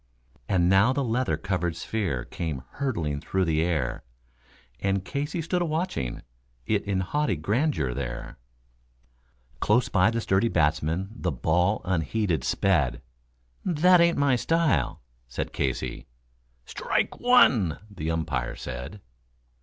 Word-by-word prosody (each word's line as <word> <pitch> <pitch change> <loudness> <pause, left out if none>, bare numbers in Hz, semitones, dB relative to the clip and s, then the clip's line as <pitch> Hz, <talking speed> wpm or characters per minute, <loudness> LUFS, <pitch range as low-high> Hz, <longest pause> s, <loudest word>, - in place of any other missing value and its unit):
And 90 -3 +3
now 95 +7 +5
the 140 - 0
leather 120 - 0
covered 90 -1 -2
sphere 85 - -2
came 80 -7 -4
hurtling 85 - -2
through 95 +3 0
the 80 -1 +1
air, 75 -8 -1 0.8
And 95 +1 0
Casey 145 +4 -3
stood 175 +3 0
a - - +1
watching 155 - -2 0.4
it 105 -2 +1
in 100 -2 0
haughty 145 +4 0
grandeur 100 - 0
there; - - -5 1.2
Close 120 - +2
by 95 0 +4
the 115 0 -1
sturdy 100 0 +2
batsman 80 +1 +1
the 90 -7 -2
ball 90 - +1
unheeded 90 +1 0
sped: 75 -11 +1 0.6
"That 180 +1 +5
ain't 170 0 +3
my 140 -2 +3
style," 135 - +1 0.2
said 60 - -4
Casey. 65 -3 -2 0.6
"Strike - - -1
one," 125 - +5
the 90 -7 -5
umpire 70 -7 -2
said. 65 +11 -7
95 Hz, 125 wpm, -26 LUFS, 75-125 Hz, 1.2 s, now